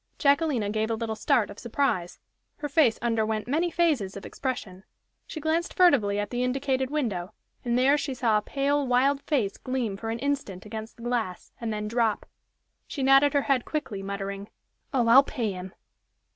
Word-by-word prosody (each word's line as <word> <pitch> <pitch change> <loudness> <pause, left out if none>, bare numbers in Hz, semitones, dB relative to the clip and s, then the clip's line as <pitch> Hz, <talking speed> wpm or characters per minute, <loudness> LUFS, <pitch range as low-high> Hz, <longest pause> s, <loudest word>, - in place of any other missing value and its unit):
Jacquelina 280 -7 +2
gave 220 +1 -1
a 225 - 0
little 220 -1 -3
start 220 -1 +1
of 200 - -11
surprise 230 -7 -1 0.4
her 295 - -4
face 280 -6 +3
underwent 220 -2 0
many 320 +7 +1
phases 295 - 0
of 195 - -9
expression; 210 -8 -5 0.4
she 315 - -6
glanced 320 +3 -1
furtively 255 - +4
at 205 0 -2
the 245 0 -1
indicated 265 0 0
window, 215 -10 -2 0.3
and 240 0 0
there 275 +4 +4
she 270 -3 -3
saw 225 -4 +2
a - - -8
pale, 280 +4 0
wild 270 +3 +3
face 240 -11 -1
gleam 255 -6 -2
for 225 +3 -5
an 225 - -2
instant 265 -9 -3
against 220 +1 -7
the 230 - -12
glass, 230 -7 -3
and 230 -1 -2
then 210 0 -3
drop. 230 -1 0 0.6
She 275 - -4
nodded 270 +2 +5
her 285 -1 +2
head 265 -3 +1
quickly, 225 -10 -4
muttering: 200 0 -5 0.4
"Oh, 245 -4 +1
I'll 245 +4 +9
pay 235 -6 -3
him!" 185 0 -7
240 Hz, 180 wpm, -27 LUFS, 210-280 Hz, 0.6 s, I'll